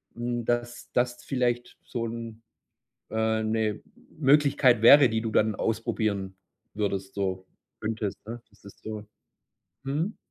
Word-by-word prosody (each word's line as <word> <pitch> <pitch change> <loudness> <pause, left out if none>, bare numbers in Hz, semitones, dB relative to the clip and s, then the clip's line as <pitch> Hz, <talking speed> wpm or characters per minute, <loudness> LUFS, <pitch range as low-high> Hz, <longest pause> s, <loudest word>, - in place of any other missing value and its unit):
hm, 120 0 -3
dass 120 0 -2
das 120 0 0
vielleicht 120 -2 -1
so 115 -2 -4
'n, 115 -1 -7 0.7
äh 110 0 +1
'ne 110 -1 -1 0.4
Möglichkeit 135 -5 +4
wäre, 135 +3 +9
die 110 -1 0
du 115 - -2
dann 110 0 +3
ausprobieren 105 -3 -1 0.4
würdest 100 -2 -2
so 95 -2 -2 0.3
könntest 110 -2 -3
'ne? 115 +1 -7
Das 100 - -26
ist 100 - -14
so 110 -1 -6 0.8
mhm. 155 +10 -2
115 Hz, 130 wpm, -27 LUFS, 110-120 Hz, 0.8 s, wäre